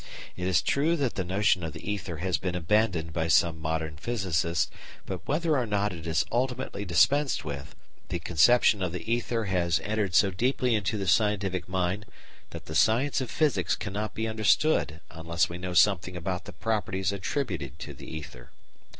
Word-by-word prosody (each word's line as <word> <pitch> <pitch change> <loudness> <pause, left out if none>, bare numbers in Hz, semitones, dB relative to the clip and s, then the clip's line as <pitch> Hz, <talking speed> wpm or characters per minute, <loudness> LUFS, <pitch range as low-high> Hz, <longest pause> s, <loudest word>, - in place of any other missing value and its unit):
It 90 0 -3
is 95 -1 +3
true 155 +5 +2
that 140 -7 -1
the 95 - -2
notion 95 0 +1
of 80 -2 -4
the 105 - -5
ether 90 -5 -4
has 90 +2 -1
been 90 -2 -3
abandoned 90 -2 +1
by 80 0 -1
some 85 -1 +3
modern 80 -1 -2
physicists, 85 -5 0 0.3
but, 95 -2 -6
whether 155 +2 +1
or 125 -4 0
not 105 -1 0
it 85 -1 -8
is 80 -1 +1
ultimately 125 -3 -2
dispensed 135 - +3
with, 70 -2 -6 0.3
the 90 - -1
conception 100 +6 +4
of 90 -3 -1
the 110 +5 -2
ether 120 -1 -1
has 85 -4 +1
entered 105 -4 -1
so 100 +1 +5
deeply 125 +5 +1
into 105 0 0
the 100 - -3
scientific 95 -1 +1
mind 95 +3 -1 0.4
that - - -9
the 80 - -7
science 125 - +3
of 130 - -4
physics 115 - +1
cannot 105 +1 -4
be 110 0 -1
understood 110 - +2
unless 80 +1 -1
we 85 +1 -6
know 90 0 -4
something 90 -1 +3
about 90 +1 -3
the - - -9
properties 95 -4 -1
attributed 95 - -3
to - - -7
the - - -11
ether. 75 -6 -9
95 Hz, 180 wpm, -28 LUFS, 85-110 Hz, 0.4 s, so